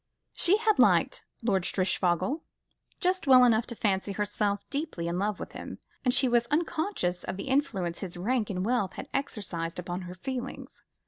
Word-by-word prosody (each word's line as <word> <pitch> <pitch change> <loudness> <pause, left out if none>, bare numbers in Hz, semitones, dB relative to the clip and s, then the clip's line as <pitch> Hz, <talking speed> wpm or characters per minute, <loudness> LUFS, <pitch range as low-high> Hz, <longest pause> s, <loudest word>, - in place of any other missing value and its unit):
She 370 +4 +4
had 435 -1 +2
liked - - +4 0.2
Lord 200 -5 +2
Strishfogel 185 - +1 0.6
just 370 -4 0
well 255 -2 +8
enough 230 -1 +4
to 235 - -6
fancy 200 -2 0
herself 205 0 -1
deeply 280 - -3
in 170 +1 -1
love 205 0 -1
with - - -6
him, - - -8 0.3
and 250 - +3
she 260 +1 +4
was 240 -1 +2
unconscious 310 - -1
of - - -4
the 230 - -5
influence 195 -11 0
his 180 -2 -4
rank 220 +4 0
and 185 -1 -2
wealth 220 -5 0
had - - -8
exercised 180 -11 -3
upon 180 +1 -4
her 180 - -8
feelings. 250 +6 -6
210 Hz, 175 wpm, -28 LUFS, 185-265 Hz, 0.6 s, well